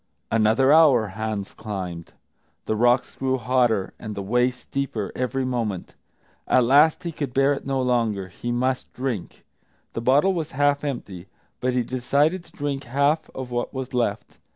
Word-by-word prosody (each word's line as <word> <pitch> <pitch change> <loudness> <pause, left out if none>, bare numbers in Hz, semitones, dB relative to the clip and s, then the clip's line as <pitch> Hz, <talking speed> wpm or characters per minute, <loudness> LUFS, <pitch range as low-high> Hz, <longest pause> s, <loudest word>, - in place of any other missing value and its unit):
Another 115 +5 +4
hour 135 -9 +5
Hans 105 0 -4
climbed; 95 -6 -6 0.5
the 110 - 0
rocks 120 +3 +2
grew 130 0 0
hotter 120 -4 +1
and 105 -2 -6
the 100 - -4
way 125 +5 +2
steeper 125 -4 -4
every 130 +1 -1
moment. 115 -7 -3 0.5
At 125 - +4
last 145 +6 +5
he 170 - -3
could 145 -5 -5
bear 135 +1 +4
it 140 - -6
no 135 -1 0
longer; 115 -6 0
he 120 +6 -5
must 130 +2 -1
drink. 125 -8 -4 0.5
The 115 - -3
bottle 140 +10 +4
was 160 -4 -4
half 145 +1 +2
empty, 100 -10 -5 0.3
but 125 0 0
he 125 -1 +1
decided 140 +8 +1
to - - -20
drink 145 -1 -4
half 140 +5 +1
of 130 -1 -6
what 120 +2 -3
was 130 0 -5
left. 125 -1 -2
125 Hz, 165 wpm, -24 LUFS, 110-140 Hz, 0.5 s, hour